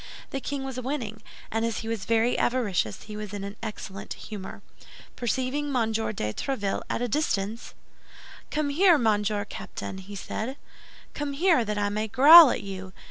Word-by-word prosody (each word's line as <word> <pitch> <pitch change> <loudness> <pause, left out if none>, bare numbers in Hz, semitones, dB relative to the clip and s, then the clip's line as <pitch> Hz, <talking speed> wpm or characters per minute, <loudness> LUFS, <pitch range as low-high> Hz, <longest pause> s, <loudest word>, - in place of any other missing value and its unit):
The 275 - -2
king 280 0 -4
was 265 -1 -5
winning; 250 -5 -4 0.3
and 225 +1 0
as 230 -2 -1
he 225 - -7
was 225 -3 -3
very 230 +1 +2
avaricious, 205 - 0
he 210 - -9
was 210 -1 -6
in 200 - -5
an 200 +1 -6
excellent 195 -3 -6
humor. 205 -3 -8 0.5
Perceiving 260 +4 -1
M. 225 -3 +1
de 215 - -2
Tréville 210 -8 -2
at 240 - -1
a - - 0
distance— 225 -5 -2 0.7
"Come 300 -1 -1
here, 345 +3 +5
Monsieur 210 -3 +1
Captain," 190 -2 -7
said 215 +4 -4
he, 270 - -8 0.6
"come 290 -1 -3
here, 320 -3 +3
that 210 -1 -3
I 205 0 +1
may 215 +1 -2
growl 290 +7 +10
at - - -2
you. 190 -1 -7
225 Hz, 170 wpm, -26 LUFS, 205-270 Hz, 0.7 s, growl